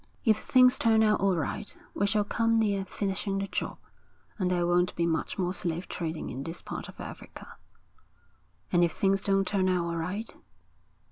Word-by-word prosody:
'If 220 -2 +5
things 255 0 +5
turn 220 -1 +4
out 210 -1 +3
all 195 -2 +2
right, 160 +6 -3 0.2
we 200 - +1
shall 210 0 +2
come 230 +2 +1
near 200 -3 +1
finishing 195 0 -2
the 195 0 -2
job, - - -3 0.6
and 185 -2 +1
there 175 -1 +1
won't 175 +1 +2
be 170 - +1
much 165 -1 -1
more 180 -1 0
slave 175 -1 -2
trading 160 -2 -4
in 135 - -5
this 165 +3 -6
part - - -6
of - - -14
Africa.' - - -10 1.1
'And 175 -1 +4
if 170 -2 +2
things 195 0 +2
don't 195 -1 +2
turn 190 -2 +1
out 180 -2 +1
all 170 0 -2
right?' 185 +7 -4
195 Hz, 185 wpm, -28 LUFS, 175-205 Hz, 1.1 s, If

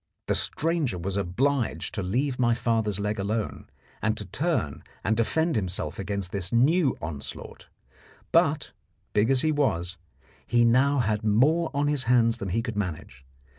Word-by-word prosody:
The - - +1
stranger 155 - 0
was 95 +3 -3
obliged 120 +7 0
to 100 - -2
leave 125 +8 -1
my 120 -2 +3
father's 110 -4 0
leg 105 +1 -2
alone 105 +2 -3 0.3
and 110 -1 0
to 105 - -3
turn 115 - -1 0.2
and 110 +3 +1
defend 160 +9 +1
himself 90 -7 -3
against 100 -2 -3
this 95 -2 -3
new 140 +4 +3
onslaught; 75 -2 -6 0.6
but, - - +2 0.4
big 105 +3 +3
as 135 -2 +3
he 155 - +2
was, 95 - 0 0.5
he 120 0 +4
now 135 +4 +4
had 105 -2 -1
more 145 +11 +3
on 145 +1 +1
his 145 -4 0
hands 115 -1 +3
than 100 - -4
he 115 +6 0
could 115 -2 -4
manage. 80 -9 -4
115 Hz, 160 wpm, -26 LUFS, 100-135 Hz, 0.6 s, he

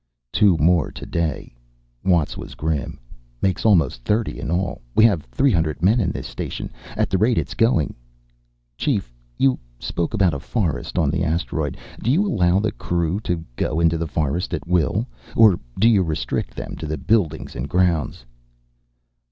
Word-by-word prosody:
"Two 100 -5 +4
more 85 0 +3
today," 80 -7 -3 0.5
Watts 85 -6 +2
was - - -8
grim. 75 -2 -2 0.4
"Makes 95 +4 0
almost 85 - +3
thirty, 105 - 0
in - - -4
all. 90 +3 -1
We - - +6
have 100 -9 +3
three 130 - +2
hundred 80 -3 0
men 105 +6 +4
in 95 -6 +1
this - - -5
station. - - -5 0.3
At - - 0
the 95 - +2
rate 115 +2 +3
it's - - -1
going 115 - +2 0.4
" - - -44
"Chief, - - -1 0.2
you 65 0 +3 0.2
spoke 85 +6 -2
about 95 -5 +3
a 70 - -3
forest 90 - -2
on 80 -5 +2
the 85 +1 0
asteroid. 80 -3 -1 0.2
Do 115 - -1
you 175 +11 +3
allow 90 - +3
the 105 0 0
crew 85 +2 -1
to 85 -6 -3
go 75 +5 -1
into 80 -1 +3
the 85 - -2
forest 80 +4 -1
at - - -6
will? 90 +6 +1 0.3
Or 110 -6 +6 0.2
do 110 - +5
you 110 -4 +5
restrict 80 -4 -2
them - - -6
to 80 - -5
the 80 +1 -2
buildings 80 - 0
and 65 +4 -4
grounds?" 85 -9 +1
85 Hz, 175 wpm, -22 LUFS, 75-100 Hz, 0.5 s, We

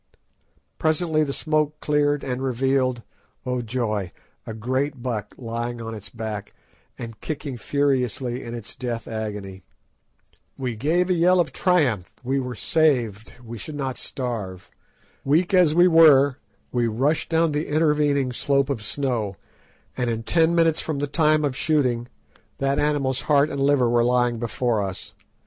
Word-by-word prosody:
Presently 155 0 +1
the 140 - -2
smoke 155 +1 0
cleared, 145 -1 +1
and 130 -1 -3
revealed—oh, 130 -1 -2
joy!—a 110 -3 -4
great 130 +3 -2
buck 110 -5 -4
lying 120 0 -4
on 115 -1 -5
its 105 -2 -9
back 110 -3 -6 0.4
and 115 -2 -8
kicking 145 -3 -4
furiously 130 -2 -1
in 120 0 -6
its 115 -2 -8
death 120 -2 -4
agony. 105 -4 -5 1.0
We 125 -4 -3
gave 170 - +1
a - - +5
yell 180 +1 +4
of 155 -6 0
triumph—we 135 - 0
were 125 -1 -4
saved—we 120 - 0
should 155 - -7
not 135 -3 -3
starve. 110 -8 -5 0.5
Weak 165 +7 +2
as 175 -5 +5
we 175 +1 +6
were, 145 -5 +6 0.3
we 120 -1 +1
rushed 135 +8 0
down 165 -1 +2
the 150 +1 -2
intervening 150 -3 +2
slope 140 +2 +1
of 120 -6 -3
snow, 115 -4 -2 0.6
and 125 -2 -1
in 115 0 -2
ten 165 +5 +2
minutes 165 -2 +3
from 155 -3 -3
the 145 - -1
time 155 +1 +2
of 135 -3 -2
shooting, 130 -6 +1 0.5
that 135 +1 0
animal's 140 -3 0
heart 145 +1 +3
and 140 - -3
liver 140 -3 +3
were 120 0 +3
lying 120 -1 +2
before 120 -1 0
us. 95 -2 -5
130 Hz, 145 wpm, -23 LUFS, 115-150 Hz, 1.0 s, we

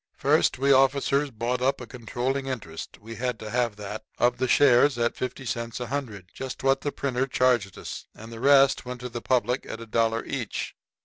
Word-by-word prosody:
First, - - +2
we 140 +2 +3
officers 140 +1 +3
bought 120 +1 -2
up 135 +2 +1
a 125 - -7
controlling 125 +3 -3
interest 105 -12 -6
we 115 +2 -9
had 125 -1 -2
to 110 -1 -7
have 120 -3 0
that 105 +1 -6
of 120 0 +2
the 130 - +1
shares 135 0 +5
at 120 0 0
50 130 +1 -5
cents 115 -1 -3
a 125 - -3
hundred 115 -8 -5
just 130 -1 -6
what 135 0 +3
the 145 - -2
printer 135 -2 -1
charged 125 -7 +1
us - - -7
and 110 +2 -11
the 115 - -8
rest 135 +1 +5
went 125 0 -7
to 125 - -5
the 120 0 -6
public 125 0 +1
at 110 - -6
a 115 - -8
dollar 115 +1 0
each. 125 -7 -4
125 Hz, 205 wpm, -26 LUFS, 115-135 Hz, -, shares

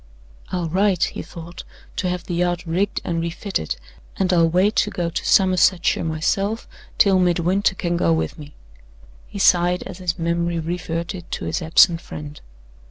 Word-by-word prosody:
"I'll 180 -2 -1
write," 185 +1 +2
he - - -5
thought, 170 0 -10 0.3
"to 185 - 0
have 180 -1 -3
the 175 - -5
yacht 175 0 0
rigged 180 +5 -1
and 165 -1 -2
refitted, 170 - -3 0.4
and 185 -1 +1
I'll 165 -2 +4
wait 185 +5 +2
to - - +3
go 170 -4 -3
to - - -3
Somersetshire 185 -2 +3
myself 195 +7 -1 0.3
till 195 -2 +5
Midwinter 180 +2 +2
can 175 -2 -1
go 85 - +2
with 80 -1 0
me." 150 0 -11 0.7
He - - -9
sighed 180 -2 +3
as 175 - -9
his 175 -2 -2
memory 170 0 -1
reverted 170 +1 -4
to - - -4
his - - -2
absent 165 +1 +5
friend. 150 0 -9
175 Hz, 165 wpm, -21 LUFS, 165-185 Hz, 0.7 s, till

